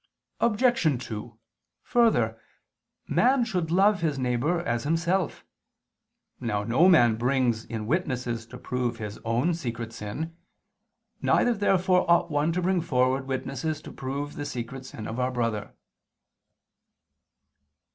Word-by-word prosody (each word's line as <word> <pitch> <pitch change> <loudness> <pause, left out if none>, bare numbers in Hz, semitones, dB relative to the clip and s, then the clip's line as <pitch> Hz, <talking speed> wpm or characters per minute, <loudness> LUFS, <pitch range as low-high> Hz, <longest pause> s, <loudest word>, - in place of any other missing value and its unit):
Obj. 210 - +2
2: 110 0 -7 0.5
Further, 235 -2 +2 0.7
man 255 -1 +3
should 180 -8 -2
love 195 +3 +4
his 155 -4 0
neighbor 130 +7 0
as 120 -7 -1
himself. 170 +3 0 0.9
Now 105 -4 -1
no 130 - +4
man 120 -11 +5
brings 120 -2 +1
in 110 -2 -5
witnesses 125 -6 -2
to 125 - -10
prove 125 -1 -2
his 105 -2 -6
own 120 +9 +1
secret 120 -8 -5
sin. 140 +11 -5 0.9
Neither 245 - +3
therefore 185 -4 +2
ought 170 0 +4
one 145 +2 +1
to 180 +1 -1
bring 185 -1 +2
forward 130 -3 +1
witnesses 135 +3 -3
to - - -9
prove 140 +2 -4
the 145 - -5
secret 130 0 -6
sin 110 - -8
of 115 +3 -4
our 125 0 +1
brother. 115 -4 -2
135 Hz, 125 wpm, -27 LUFS, 120-175 Hz, 0.9 s, man